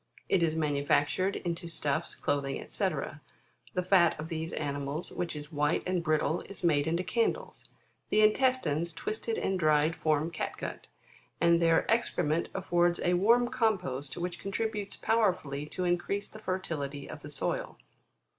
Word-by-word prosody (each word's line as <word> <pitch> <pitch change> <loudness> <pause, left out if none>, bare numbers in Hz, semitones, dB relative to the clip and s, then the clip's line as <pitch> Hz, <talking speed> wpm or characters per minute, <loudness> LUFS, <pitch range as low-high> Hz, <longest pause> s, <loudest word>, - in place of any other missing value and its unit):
It 190 - +3
is 160 -1 +2
manufactured 150 +5 +1
into 170 -1 -3
stuffs, 155 -1 -1
cloth, 145 -1 0 0.3
&c. - - +1 0.9
The 180 - +1
fat 175 -5 +4
of 155 +1 -5
these 160 -1 -3
animals, 145 +1 -3
which 175 -3 -3
is 150 +1 -7
white 150 0 +1
and 180 -1 0
brittle, 155 +1 +1
is 195 -2 -9
made 150 -3 +3
into 170 +2 0
candles; 225 +6 -1 0.4
the 215 - +4
intestines 215 - +2
twisted 440 - -3
and 190 - 0
dried, 155 0 +3
form 155 +1 +1
cat 165 - -4
gut; - - -6 0.5
and 170 0 +4
their 165 -1 +4
excrement 170 -8 +1
affords 175 -2 +2
a 175 - +3
warm 235 +7 +4
compost 185 - -1
which 175 0 -4
con 195 - -4
tributes 210 -1 -2
powerfully 180 -10 +1
to 180 +4 -4
increase 180 +3 0
the 215 - -12
fertility 150 -8 -3
of - - -8
the - - -9
soil. - - -2
170 Hz, 155 wpm, -30 LUFS, 150-195 Hz, 0.9 s, fat